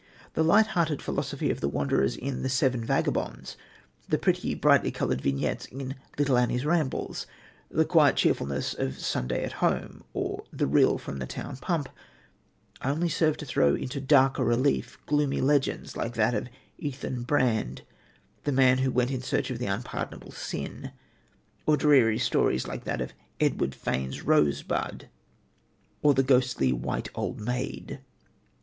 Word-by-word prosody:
The - - +1
light 205 +7 +6
hearted 160 -4 +1
philosophy - - -2
of - - -4
the 70 - +1
wanderers 70 -1 +1
in 135 0 -4
The 130 - -1
Seven 130 -2 +1
Vagabonds, - - -1 0.5
the - - +3
pretty, - - 0
brightly - - +4
coloured 65 - -1
vignettes 70 0 -1
in 135 0 -6 0.2
Little 140 -4 +3
Annie's 125 +2 0
Rambles, 155 -3 -1 0.4
the 160 - +2
quiet 155 -3 +5
cheerfulness 70 -1 0
of 65 0 -3
Sunday 60 0 -1
at - - -3
Home - - 0
or - - -3
The - - 0
Rill 70 - +4
from 70 - -7
the 65 - -4
Town - - -6
Pump, 155 -1 -1 1.0
only 155 +6 0
serve 155 -1 +2
to 150 - -7
throw 70 - +3
into 135 +2 -4
darker 135 -1 +4
relief 125 +4 +1
gloomy 145 -1 +1
legends 140 0 +1
like 120 +1 -3
that 110 +2 +2
of 125 - -2 0.3
Ethan 130 -3 -4
Brand, 120 - 0 0.6
the 145 - 0
man 130 -1 +4
who 130 0 +2
went 125 0 +1
in 130 -2 -2
search 130 - -1
of 120 - -4
the 125 - -2
Unpardonable 100 +5 -4
Sin, - - -6 0.7
or 155 -1 +5
dreary 130 -8 +5
stories 65 - +1
like - - -6
that - - -2
of 65 - -4 0.3
Edward 65 - +1
Fane's 65 +1 -3
Rosebud, 75 -1 +1 0.9
or 145 -2 +5
the 135 - +4
ghostly 125 - +3
White 60 +2 -3
Old - - -3
Maid. 125 +4 -4
130 Hz, 155 wpm, -27 LUFS, 110-145 Hz, 1.0 s, light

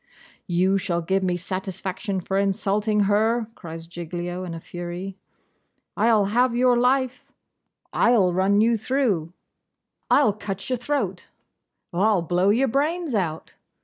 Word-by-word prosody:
'You 190 +2 +2
shall 170 -2 -2
give 190 +3 +1
me 180 -1 0
satisfaction 190 +2 -4
for 195 +2 -1
insulting 205 +2 +1
her!' 220 +3 +2
cries 165 -5 -9
Giglio 175 +1 -5
in 175 -2 -5
a - - -6
fury. 175 +3 -6 0.8
'I'll 215 -1 +3
have 235 +4 +2
your 250 0 +4
life.' 255 +1 +1 0.6
'I'll 210 -7 +3
run 195 +3 +3
you 230 +1 +3
through.' 220 - 0 0.8
'I'll 275 -8 +4
cut 200 +2 -6
your 255 - +1
throat.' 240 -8 -2 0.7
'I'll 195 0 +2
blow 180 +3 +2
your 245 +6 +3
brains 300 +4 0
out. 165 -7 -2
195 Hz, 130 wpm, -24 LUFS, 180-235 Hz, 0.8 s, your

